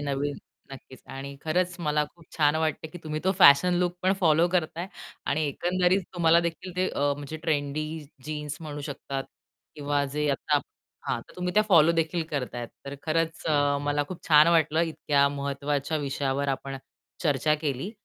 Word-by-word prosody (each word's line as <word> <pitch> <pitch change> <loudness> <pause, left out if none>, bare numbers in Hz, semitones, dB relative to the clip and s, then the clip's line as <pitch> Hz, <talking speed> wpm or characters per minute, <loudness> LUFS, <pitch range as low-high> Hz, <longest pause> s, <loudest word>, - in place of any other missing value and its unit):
नवीन 145 0 -2 0.4
नक्कीच 130 -1 -12
आणि 140 +1 -7
खरंच 180 +3 +1
मला 150 -2 +1
खूप 170 -2 -19
छान 150 -1 +3
वाटतंय 160 0 -1
की 175 - -9
तुम्ही 155 0 -3
तो 190 - +3
फॅशन 175 +2 +7
लूक 180 -1 0
पण 185 +1 +3
फॉलो 165 -1 +4
करताय 175 -1 -1 0.4
आणि 155 +2 +1
एकंदरीत 180 +5 +1
तुम्हाला 170 -1 +5
देखील 170 +2 -5
ते 185 0 +1
अ, - - -4 0.2
म्हणजे 145 +2 -6
ट्रेंडी 155 0 -2 0.2
जीन्स 150 -1 -4
म्हणू 150 -2 -6
शकतात 140 -1 -5 0.5
किंवा 145 -1 0
जे 150 +2 -2
आता 145 +1 +1 0.5
हां. - - 0
तर - - -17
तुम्ही 180 0 -2
त्या 215 - +6
फॉलो 170 -3 +6
देखील 165 +1 0
करताहेत. 125 -4 -3 0.2
तर 140 +1 -6
खरंच 165 +1 -1
अ, 145 -2 +2
मला 145 0 +1
खूप 180 -2 -8
छान 150 -1 +7
वाटलं 160 -1 +3
इतक्या 145 -4 +2
महत्वाच्या 140 +1 -2
विषयावर 140 -1 -1
आपण 135 0 -3 0.5
चर्चा 150 0 +2
केली. 150 +3 -3
150 Hz, 165 wpm, -27 LUFS, 140-165 Hz, 0.5 s, फॅशन